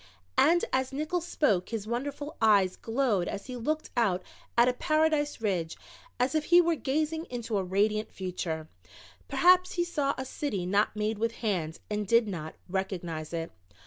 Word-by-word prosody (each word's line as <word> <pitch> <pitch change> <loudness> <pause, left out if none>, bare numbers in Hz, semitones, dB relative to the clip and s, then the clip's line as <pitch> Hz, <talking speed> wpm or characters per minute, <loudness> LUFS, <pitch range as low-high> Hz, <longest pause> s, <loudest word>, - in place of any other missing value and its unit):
And 345 +3 +5
as 260 0 +1
Nickols 310 +5 -2
spoke 200 - +1
his 225 -3 -3
wonderful 285 +6 -4
eyes 200 -4 +4
glowed 225 -6 0
as 200 0 -5
he 255 - -6
looked 305 +6 -2
out 195 -7 +2 0.3
at 245 +1 +4
Paradise 310 -2 +2
Ridge 180 -7 -1 0.4
as 250 +2 +2
if 310 -1 +1
he 350 0 +7
were 340 -1 +4
gazing 315 +2 -1
into 235 - -3
a - - -1
radiant 210 +3 +1
future 175 -4 -4 0.6
perhaps 360 +6 +4
he 345 - +1
saw 295 -5 -1
a 260 - -4
city 235 -9 -3
not 200 +4 +2
made 210 0 -1
with 230 +1 0
hands 165 -7 -1
and 210 -1 -2
did 230 +1 +4
not 160 -5 -5
recognize 175 -4 -3
it. 165 -1 -3
230 Hz, 165 wpm, -29 LUFS, 190-290 Hz, 0.6 s, he